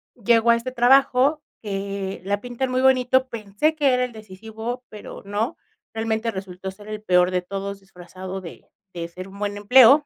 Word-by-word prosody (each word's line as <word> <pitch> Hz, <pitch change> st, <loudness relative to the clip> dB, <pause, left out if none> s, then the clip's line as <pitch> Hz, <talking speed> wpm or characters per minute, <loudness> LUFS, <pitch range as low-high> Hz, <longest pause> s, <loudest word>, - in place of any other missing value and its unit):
Llego 235 Hz, 0 st, +4 dB
a -, -, +6 dB
este 235 Hz, +2 st, -4 dB
trabajo, 265 Hz, +3 st, +4 dB, 0.2 s
eh, 195 Hz, -2 st, -4 dB
la 205 Hz, +1 st, -1 dB
pintan 245 Hz, +2 st, -3 dB
muy 255 Hz, -, +1 dB
bonito, 260 Hz, 0 st, +4 dB
pensé 225 Hz, +7 st, -1 dB
que 285 Hz, -4 st, +3 dB
era 250 Hz, 0 st, +2 dB
el 250 Hz, -, -8 dB
decisivo, 220 Hz, +4 st, -7 dB
pero 210 Hz, 0 st, -10 dB
no, 210 Hz, +8 st, -2 dB, 0.4 s
realmente 225 Hz, 0 st, -1 dB
resultó 190 Hz, -1 st, -6 dB
ser 205 Hz, +2 st, -15 dB
el 215 Hz, 0 st, -5 dB
peor 180 Hz, -2 st, +4 dB
de 180 Hz, -1 st, 0 dB
todos, 195 Hz, +2 st, -5 dB
disfrazado 185 Hz, 0 st, -9 dB
de 170 Hz, -3 st, -11 dB, 0.3 s
de 170 Hz, -1 st, -4 dB
ser 185 Hz, +3 st, -9 dB
un 200 Hz, +1 st, -12 dB
buen 205 Hz, 0 st, -2 dB
empleo 250 Hz, +7 st, +7 dB
215 Hz, 180 wpm, -23 LUFS, 195-250 Hz, 0.4 s, empleo